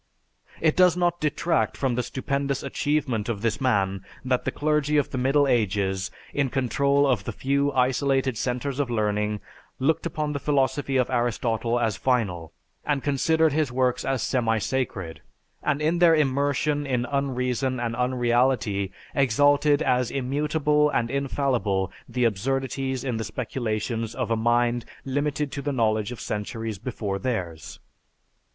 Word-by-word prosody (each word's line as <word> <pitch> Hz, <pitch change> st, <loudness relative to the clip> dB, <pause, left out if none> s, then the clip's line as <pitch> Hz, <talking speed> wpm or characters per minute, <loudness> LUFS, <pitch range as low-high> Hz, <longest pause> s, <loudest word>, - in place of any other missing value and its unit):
It 160 Hz, -2 st, +3 dB
does 180 Hz, -1 st, +5 dB
not 175 Hz, -1 st, +1 dB
detract 155 Hz, +2 st, 0 dB
from 135 Hz, -3 st, 0 dB
the 125 Hz, -, 0 dB
stupendous 140 Hz, +2 st, -2 dB
achievement 135 Hz, -5 st, -1 dB
of 110 Hz, -2 st, -3 dB
this 115 Hz, +3 st, 0 dB
man 100 Hz, -7 st, +1 dB, 0.2 s
that 130 Hz, -1 st, 0 dB
the -, -, 0 dB
clergy 150 Hz, 0 st, +1 dB
of 145 Hz, -, +1 dB
the -, -, -3 dB
Middle 140 Hz, +3 st, +3 dB
Ages, 100 Hz, -5 st, +1 dB, 0.2 s
in 140 Hz, -2 st, +1 dB
control 140 Hz, +2 st, +2 dB
of 130 Hz, -4 st, +1 dB
the -, -, -3 dB
few 140 Hz, +1 st, 0 dB
isolated 130 Hz, 0 st, +1 dB
centers 125 Hz, +4 st, -2 dB
of 140 Hz, -3 st, 0 dB
learning, 105 Hz, -2 st, 0 dB, 0.4 s
looked 155 Hz, +5 st, +1 dB
upon 150 Hz, -2 st, -2 dB
the 140 Hz, -, -2 dB
philosophy 140 Hz, -1 st, +1 dB
of 125 Hz, -1 st, +1 dB
Aristotle 120 Hz, -1 st, 0 dB
as 110 Hz, -4 st, 0 dB
final 100 Hz, -, 0 dB, 0.3 s
and 145 Hz, -3 st, -1 dB
considered 160 Hz, +2 st, +2 dB
his 150 Hz, -4 st, +1 dB
works 125 Hz, 0 st, +1 dB
as 135 Hz, -2 st, -1 dB
semi 115 Hz, -4 st, +1 dB
sacred, 100 Hz, -, -3 dB, 0.4 s
and 150 Hz, 0 st, 0 dB
in 165 Hz, +3 st, +1 dB
their 170 Hz, -2 st, +6 dB
immersion 145 Hz, 0 st, +1 dB
in 125 Hz, -2 st, 0 dB
un 140 Hz, -1 st, -1 dB
reason 125 Hz, +1 st, -1 dB
and 115 Hz, -1 st, -2 dB
unreality, 120 Hz, -5 st, +1 dB, 0.2 s
exalted 145 Hz, +3 st, +3 dB
as 125 Hz, -1 st, +2 dB
immutable 150 Hz, +3 st, +1 dB
and 115 Hz, -4 st, 0 dB
infallible 130 Hz, -9 st, 0 dB, 0.2 s
the 125 Hz, -, -1 dB
absurdities 130 Hz, +4 st, -1 dB
in 125 Hz, -4 st, -2 dB
the 110 Hz, -, -2 dB
speculations 115 Hz, -1 st, -3 dB
of 125 Hz, -3 st, -2 dB
a -, -, +3 dB
mind 120 Hz, +1 st, +2 dB, 0.2 s
limited 145 Hz, +1 st, -1 dB
to 140 Hz, -, -4 dB
the 145 Hz, -, -2 dB
knowledge 110 Hz, -3 st, +1 dB
of 125 Hz, -, -7 dB
centuries 110 Hz, 0 st, -4 dB
before 105 Hz, -5 st, -3 dB
theirs. 90 Hz, -, -4 dB
130 Hz, 150 wpm, -25 LUFS, 115-140 Hz, 0.4 s, their